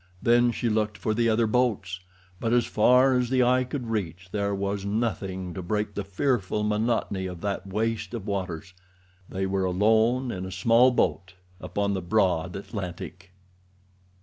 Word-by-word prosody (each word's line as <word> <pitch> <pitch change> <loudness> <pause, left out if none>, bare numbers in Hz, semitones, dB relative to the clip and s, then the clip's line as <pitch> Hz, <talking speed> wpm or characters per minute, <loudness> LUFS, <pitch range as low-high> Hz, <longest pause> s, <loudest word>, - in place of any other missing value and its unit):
Then 120 +2 +4
she 120 - -2
looked 105 -1 0
for 110 - -1
the 115 +1 +2
other 115 +1 +3
boats, 110 -6 0 0.4
but 115 0 0
as 120 -1 +3
far 125 +4 +4
as 125 -1 +1
the 130 -1 +3
eye 125 +1 +3
could 125 -2 -5
reach 90 -4 -3
there 100 -1 -1
was 100 0 -2
nothing 100 -4 -2
to 95 - -5
break 105 +3 -2
the 100 - -3
fearful 105 0 -1
monotony 105 -3 0
of 90 -2 -8
that 100 -1 -3
waste 110 +4 -2
of 110 -4 -6
waters—they 95 0 -6
were 95 0 0
alone 110 +7 +2
in 95 -3 -5
a 95 - -6
small 115 +7 +4
boat 95 -7 0 0.2
upon 100 0 -2
the 95 - -2
broad 90 -2 +1
Atlantic. 95 -2 -7
100 Hz, 160 wpm, -26 LUFS, 95-115 Hz, 0.4 s, Then